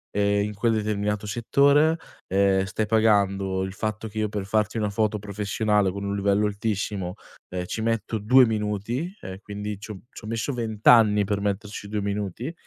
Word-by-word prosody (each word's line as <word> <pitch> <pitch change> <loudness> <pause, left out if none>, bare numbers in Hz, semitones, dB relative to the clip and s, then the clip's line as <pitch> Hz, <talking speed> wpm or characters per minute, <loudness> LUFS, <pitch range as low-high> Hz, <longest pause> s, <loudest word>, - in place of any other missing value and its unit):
e 100 0 +2
in 105 0 -3
quel 115 +3 +1
determinato 105 -1 -1
settore. 140 +8 +3 0.3
Ehm, 95 0 +2
stai 105 +3 -2
pagando 100 -3 +2
il 95 0 -4
fatto 110 +2 -3
che 110 +1 -6
io 105 -1 0
per 105 -2 -4
farti 110 +2 0
una 105 -2 0
foto 105 +1 0
professionale 105 0 0
con 100 +1 -6
un 100 0 -2
livello 100 +1 +2
altissimo, 100 -3 -2 0.3
ehm, 90 0 -4
ci 110 - -4
metto 115 -1 -1
2 125 +5 +6
minuti 110 - -2
e 95 0 -7
quindi 105 0 -5
c'ho 105 -2 -8
c'ho 110 - -10
messo 115 +5 -2
20 110 -3 -5
anni 105 -3 +7
per 100 0 -1
metterci 105 0 -3
2 105 0 -2
minuti 100 - -3
105 Hz, 175 wpm, -25 LUFS, 100-110 Hz, 0.3 s, anni